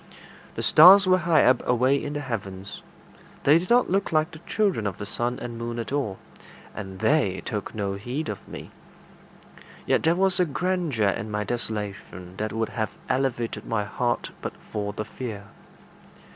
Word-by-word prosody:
The - - -3
stars 190 +5 +8
were 185 0 +4
high 170 -2 +3
up, 130 -1 +4
away 130 +3 +2
in 145 - -4
the 145 - -3
heavens. 100 -7 -6 0.6
They 150 +4 +6
did 180 - -7
not 245 -3 +4
look 195 0 +1
like 155 0 +2
the 160 - -11
children 195 - +1
of 95 - -4
the 105 - -6
sun 120 +4 -2
and 120 -1 -7
moon 115 0 -4
at 115 0 -4
all, 130 -9 -1 0.6
and 95 -3 -7
they 135 -12 +2
took 105 -1 -4
no 100 -2 -2
heed 125 +10 -4
of 105 - -6
me. - - -9 1.1
Yet - - +2
there 165 +1 +3
was 190 0 +3
a 180 - +4
grandeur 160 - 0
in 110 +2 -3
my 105 0 -2
desolation 100 -5 -5
that 110 0 -2
would 115 0 -2
have 110 -2 -4
elevated 130 -3 -1
my 115 -3 0
heart 120 +4 -2
but - - -4 0.2
for 105 -1 -2
the 105 +1 -5
fear. 110 -2 -6
120 Hz, 175 wpm, -25 LUFS, 105-155 Hz, 1.1 s, stars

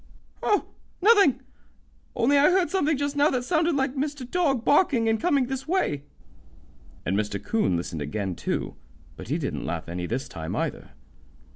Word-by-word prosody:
"Oh, 415 - +2 0.3
nothing; 395 - +5 0.7
only 245 +5 +3
I 285 +1 +6
heard 365 -3 +2
something 315 -6 +1
just 285 +1 -2
now 290 +1 +4
that 250 -2 -1
sounded 325 +3 +1
like 270 -1 0
Mr. 285 -2 -3
Dog 275 -6 0
barking 280 -7 +3
and 225 0 +2
coming 290 -6 +2
this 265 +2 -5
way." 310 - 0 1.0
And 95 - 0
Mr. 105 -1 -1
'Coon 215 - 0
listened 85 -2 -4
again, 95 +6 -3
too, - - -3 0.4
but - - -10
he - - 0
didn't - - -3
laugh - - -4
any 90 +1 -4
this 130 +6 -3
time, 80 -2 -6
either. - - -3
270 Hz, 165 wpm, -25 LUFS, -, 1.0 s, I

